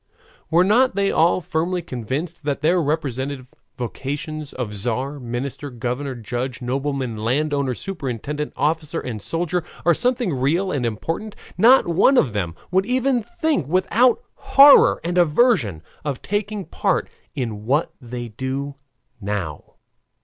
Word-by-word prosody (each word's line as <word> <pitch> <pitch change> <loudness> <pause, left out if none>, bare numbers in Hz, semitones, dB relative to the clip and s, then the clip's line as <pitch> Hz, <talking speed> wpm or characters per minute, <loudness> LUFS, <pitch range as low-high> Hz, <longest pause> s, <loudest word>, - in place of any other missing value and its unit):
Were 170 +2 +5
not 235 +4 +3
they 200 0 +2
all 170 +3 +3
firmly 170 +2 -1
convinced 150 +5 -4
that 145 -1 -2
their 170 +3 +3
respective 140 -3 -2 0.3
vocations 145 +5 -5
of 125 -5 -4
tzar, 125 +7 -2
minister, 125 +3 -4
governor, 125 +2 -3
judge, 120 +2 -4
nobleman, 130 -1 -2
landowner, 135 +3 0
superintendent, 150 - -4
officer, 155 0 0
and 110 -4 -5
soldier 175 - -1 0.2
are 170 - +6
something 245 - 0
real 160 +9 +1
and 130 -5 0
important, 165 - -4 0.2
not 250 +1 +6
one 190 +11 +4
of 125 - +3
them 90 -5 -2 0.2
would 190 +2 +2
even 255 0 +1
think 235 - -1
without 220 - +3
horror 280 +1 +7
and 175 +2 0
aversion 155 - +3 0.2
of 145 -4 -4
taking 205 -1 -2
part 195 -4 0 0.3
in 110 -6 -4
what 145 +5 +1
they 120 -1 -6
do 130 +5 -4 0.5
now. 100 -7 -5
145 Hz, 135 wpm, -22 LUFS, 125-180 Hz, 0.5 s, horror